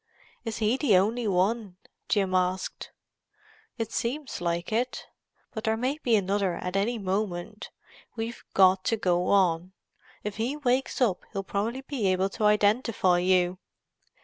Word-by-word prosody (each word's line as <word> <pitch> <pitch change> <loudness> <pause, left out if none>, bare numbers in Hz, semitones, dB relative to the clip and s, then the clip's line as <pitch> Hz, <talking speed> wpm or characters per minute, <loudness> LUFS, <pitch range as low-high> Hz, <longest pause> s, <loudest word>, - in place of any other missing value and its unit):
"Is 225 -1 -4
he 225 +3 +1
the 245 -10 +4
only 220 +5 +1
one?" 195 +1 0 0.3
Jim 195 -3 +1
asked. 185 0 -1 0.9
"It 225 -2 -3
seems 265 +1 -3
like 170 +1 -2
it. 245 +3 -1 0.5
But 220 - -5
there 220 0 +1
may 260 +6 -1
be 235 -3 +3
another 195 -2 +1
at 180 +2 -5
any 220 +5 +1
moment. 195 0 -3 0.5
We've 230 +1 -5
got 185 0 +5
to 225 - +1
go 180 -3 +1
on; 180 -2 +2 0.5
if 205 -1 -4
he 240 +6 -1
wakes 260 -1 0
up 215 -8 +2
he'll 195 - -2
probably 215 +7 -2
be 270 -7 -2
able 185 +1 +2
to 210 - -2
identify 210 -3 +3
you." 180 0 +2
205 Hz, 150 wpm, -27 LUFS, 185-230 Hz, 0.9 s, got